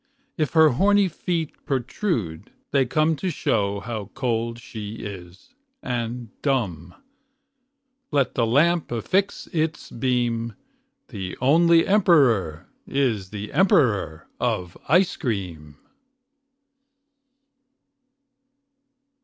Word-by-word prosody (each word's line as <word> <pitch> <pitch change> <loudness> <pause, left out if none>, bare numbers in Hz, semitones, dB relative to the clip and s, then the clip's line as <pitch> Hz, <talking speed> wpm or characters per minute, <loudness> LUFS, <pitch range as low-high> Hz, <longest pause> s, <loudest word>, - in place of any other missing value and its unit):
If 155 -3 -1
her 160 -1 +7
horny 200 +9 +3
feet 170 -2 -4
protrude, 125 - -2 0.2
they 135 -2 +2
come 155 +5 +2
To 185 - -2
show 100 - 0
how 110 -3 -5
cold 115 -3 -1
she 110 -3 -8
is, 95 -4 -10 0.3
and 120 -1 -3
dumb. 95 - -1 1.1
Let 140 -4 +1
the 115 -2 +1
lamp 165 +7 +2
affix 185 - -1
its 160 -1 -2
beam. 120 -3 -1 0.5
The 95 -2 -6
only 165 +5 +5
emperor 135 - +3 0.2
is 115 -9 0
the 105 0 -7
emperor 115 - +2
of 90 -1 -2
ice 180 +4 +4
cream. 85 - -4
120 Hz, 95 wpm, -24 LUFS, 105-155 Hz, 1.1 s, her